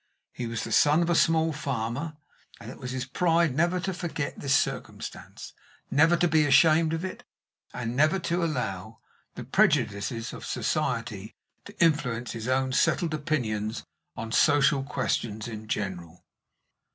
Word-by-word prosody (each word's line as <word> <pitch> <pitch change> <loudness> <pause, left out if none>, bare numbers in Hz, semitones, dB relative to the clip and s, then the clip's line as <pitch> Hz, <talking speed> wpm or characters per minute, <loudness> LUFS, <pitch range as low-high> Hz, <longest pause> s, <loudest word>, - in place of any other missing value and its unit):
He 120 - -4
was 115 -1 -3
the - - -6
son 150 +3 +4
of 170 - 0
a - - +3
small 160 -1 +3
farmer, 140 +2 -3 0.4
and - - -9
it - - -12
was 125 - -6
his 130 0 -3
pride 165 +2 +2
never 175 +4 +2
to 190 +2 -2
forget 165 -4 -4
this 140 0 +3
circumstance, - - -5 0.4
never 165 +5 +4
to 175 - +3
be 155 -2 +3
ashamed 160 +3 +5
of 165 +3 -2
it, 185 - -7 0.5
and 120 -1 -4
never 155 +6 +3
to 175 -1 -1
allow 110 - -3 0.4
the - - -6
prejudices 105 +3 +1
of - - -9
society - - -2 0.3
to - - -13
influence 125 -8 +1
his 115 0 -6
own 130 0 +1
settled 165 +4 +2
opinions 120 -9 -2 0.3
on 115 0 -5
social 145 +1 +4
questions 120 -5 -2
in 110 -1 -8
general. 90 -5 -5
140 Hz, 150 wpm, -27 LUFS, 115-160 Hz, 0.5 s, ashamed